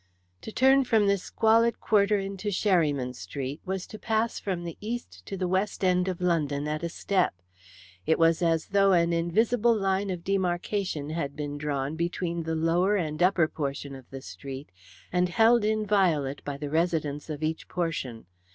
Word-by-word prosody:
To - - -7
turn 265 +3 +5
from 225 -4 +3
this 200 -2 +2
squalid 230 +3 +2
quarter 205 -1 +3
into 195 +1 -5
Sherryman 155 - +1
Street 130 - -6
was 190 -1 -2
to 215 - -10
pass 225 0 0
from 185 -4 -3
the 170 -2 -6
east 235 +3 -6
to 195 - -4
the 185 -1 -1
west 190 +3 -1
end 180 0 +2
of 185 -1 -3
London 150 -5 0
at 155 0 -2
a 170 - -2
step. 185 - 0 0.7
It 160 - +3
was 165 0 +3
as 165 -2 +1
though 195 -1 +4
an 170 -1 +3
invisible 220 +8 +2
line 195 -1 0
of 180 -2 -4
demarcation 180 -4 -1
had 145 -3 -3
been 145 -1 -4
drawn 145 0 -2
between 170 0 -2
the 160 0 -2
lower 170 +5 +2
and 155 -4 -2
upper 180 -3 +4
portion 140 -2 -4
of 130 -2 -12
the 135 -1 -8
street, 135 0 -8 0.4
and 180 0 +2
held 225 +4 +4
inviolate 195 -10 +1
by 145 -1 -4
the 145 0 -5
residents 160 -3 -1
of 155 0 -5
each 160 +1 -2
portion. 155 - -3
175 Hz, 175 wpm, -27 LUFS, 150-200 Hz, 0.7 s, turn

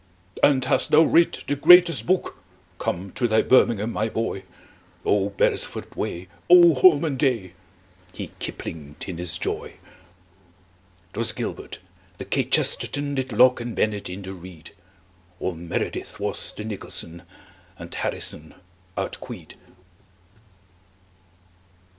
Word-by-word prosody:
"And 135 -3 +4
hast 130 -1 +1
thou 155 +2 +6
writ 170 +2 +2
the 145 - -1
greatest 175 +2 +6
book? 185 +1 0 0.4
Come 95 +2 -3
to 125 -2 0
thy 110 -1 +3
birmingham, 115 -3 +3
my 110 +1 -1
boy! 110 -3 -3 0.6
Oh, 100 -1 +2
beresford 100 - -1
way! 90 +2 -4 0.2
Oh, 175 -1 +8
holman 145 0 +4
day!" 115 -10 0 0.6
He - - -8
kiplinged 75 -2 -7
in 90 -3 -6
his 90 -2 -1
joy. - - -4 1.4
'Twas - - 0
gilbert. - - -6 0.4
The - - -7
kchesterton 145 0 +1
Did 130 -1 -3
locke 125 +3 +4
and 120 -1 -5
bennett 105 -3 -1
in 95 +2 -7
the 95 0 -7
reed. 85 -4 -12 0.7
All 90 - -2
meredith 85 0 -5
was - - -3
the 105 - -7
nicholson, 85 -5 -5 0.6
And - - -10
harrison 80 +1 -4 0.4
outqueed. - - -6
110 Hz, 115 wpm, -24 LUFS, 95-140 Hz, 1.4 s, Oh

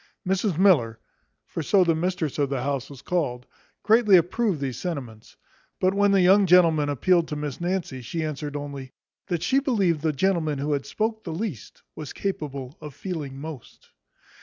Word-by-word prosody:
Mrs 190 -2 0
Miller 140 - +4 0.5
(for - - -5
so 190 +5 +4
the 170 -2 +2
mistress 165 -3 -2
of 140 -2 +1
the 135 -3 -2
house 140 -1 -2
was 140 -3 -12
called) 130 -9 -2 0.4
greatly 215 -2 +6
approved 180 +1 0
these 135 -4 -4
sentiments; 130 - -6 0.4
but 185 +1 +2
when 205 0 +3
the 195 -2 +4
young 195 +2 +5
gentleman 165 -4 +5
appealed 170 +5 +2
to 150 - -4
Miss 150 0 -5
Nancy, 175 -7 -2
she 160 +8 -4
answered 150 -1 -4
only, 140 -2 -6 0.3
"That 175 -2 -2
she 265 +9 +3
believed 200 - +1
the 160 0 +1
gentleman 155 -1 0
who 145 +2 -1
had 140 -1 -2
spoke 220 +5 -2
the 170 - -5
least 165 - -6
was 150 -3 -7
capable 140 -8 -5
of 150 -3 -9
feeling 145 -7 -5
most." 150 -4 -10
160 Hz, 175 wpm, -25 LUFS, 140-185 Hz, 0.5 s, greatly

